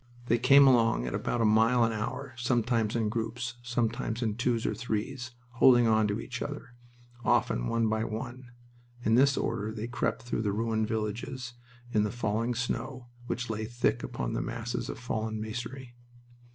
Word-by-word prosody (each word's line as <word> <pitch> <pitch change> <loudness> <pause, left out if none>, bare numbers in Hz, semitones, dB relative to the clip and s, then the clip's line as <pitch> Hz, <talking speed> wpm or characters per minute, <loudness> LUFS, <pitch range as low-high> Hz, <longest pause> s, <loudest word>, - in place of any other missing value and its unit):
They 120 0 +2
came 140 +3 +7
along 115 - +4
at 60 - -3
about 120 - -1
a - - +4
mile 115 +3 +4
an 115 - +2
hour, 130 +5 -4
sometimes 120 -2 +1
in 115 -2 +1
groups, 115 +2 -3
sometimes 120 0 -1
by 115 -3 +1
twos 120 -1 0
or - - +1
threes, 120 +1 -4 0.2
holding 120 0 +6
on 110 -1 +4
to 105 +1 -1
each 120 -1 -6
other, 145 -4 -6 0.5
often - - +2
one 115 -1 +1
by 110 0 0
one. 120 +3 -6 0.6
In 110 - +3
this 135 +3 +5
order 110 -2 -1
they 110 0 -4
crept 115 -1 -2
through 120 -2 -2
the 105 -2 0
ruined 110 0 0
villages 115 +4 -3 0.4
in 105 - +3
the 105 - +1
falling 115 +1 -1
snow, 125 +1 -3 0.2
which 125 -2 -2
lay 110 0 -3
thick 120 +2 0
upon - - -3
the - - -1
masses 115 +1 -4
of - - -4
fallen 110 -2 -3
masonry. 120 +3 -6
115 Hz, 175 wpm, -29 LUFS, 110-125 Hz, 0.6 s, came